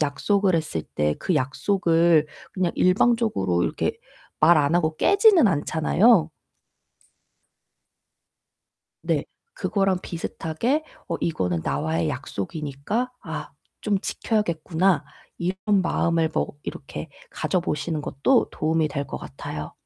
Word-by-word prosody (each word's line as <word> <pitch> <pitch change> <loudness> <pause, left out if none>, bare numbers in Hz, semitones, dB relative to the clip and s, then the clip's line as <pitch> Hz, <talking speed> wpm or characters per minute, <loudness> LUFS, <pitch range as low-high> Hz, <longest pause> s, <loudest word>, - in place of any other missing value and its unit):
약속을 185 +7 +1
했을 155 - -1
때 75 0 +1
그 185 - -1
약속을 165 +2 +2 0.2
그냥 185 -3 0
일방적으로 185 - +2
이렇게 - - -2 0.4
말 165 +2 +6
안 145 +1 +2
하고 160 -2 +1
깨지는 400 - +5
않잖아요. 165 +4 +3 2.7
네. - - 0 0.3
그거랑 195 -3 0
비슷하게 175 - -2 0.2
'어 170 - -1
이거는 90 - -1
나와의 80 +3 -1
약속이니까 150 - -3
아 - - -6 0.3
좀 210 -2 +1
지켜야겠구나.' 175 -6 0 0.3
이런 180 +2 -2 0.3
마음을 165 -2 +1
뭐 - - 0 0.2
이렇게 145 +3 -7 0.2
가져 160 +4 -1
보시는 155 -1 -2
것도 235 - +2
도움이 160 0 0
될 140 -1 -3
것 - - -6
같아요. - - -7
165 Hz, 250 characters per minute, -24 LUFS, 145-195 Hz, 2.7 s, 말